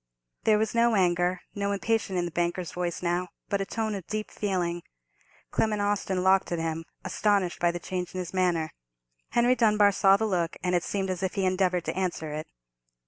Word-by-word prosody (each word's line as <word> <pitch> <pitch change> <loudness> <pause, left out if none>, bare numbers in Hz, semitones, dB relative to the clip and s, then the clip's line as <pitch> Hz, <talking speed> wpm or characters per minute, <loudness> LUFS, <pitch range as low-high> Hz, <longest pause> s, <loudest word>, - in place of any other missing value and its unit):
There 215 -1 +5
was 220 +1 0
no 235 -1 +4
anger, 180 -1 +2
no 200 0 -1
impatience 220 -1 0
in 175 - +1
the 170 - -4
banker's 175 0 -1
voice 175 -1 -3
now, 175 +1 0 0.2
but 200 -1 0
a 195 - -3
tone 220 -1 -2
of 195 -4 -6
deep 215 0 -3
feeling. 175 -4 -1 0.7
Clement 215 -1 +1
Austin 200 -2 0
locked 190 0 +3
at 170 - 0
him, 165 0 -2 0.2
astonished 200 -4 +1
by 175 - +3
the 170 - -2
change 180 +1 -4
in - - -2
his 180 -1 -5
manner. 175 -4 +1 0.6
Henry 240 +1 +4
Dunbar 210 -4 +4
saw 195 0 +5
the 220 - 0
look, 175 -5 -1
and 180 -1 0
it 175 -1 +2
seemed 195 -2 -1
as 185 0 -4
if 190 -1 -2
he 195 - +1
endeavoured 185 -2 +1
to - - -2
answer 175 -4 -2
it. 155 +1 -5
185 Hz, 200 wpm, -27 LUFS, 175-205 Hz, 0.7 s, There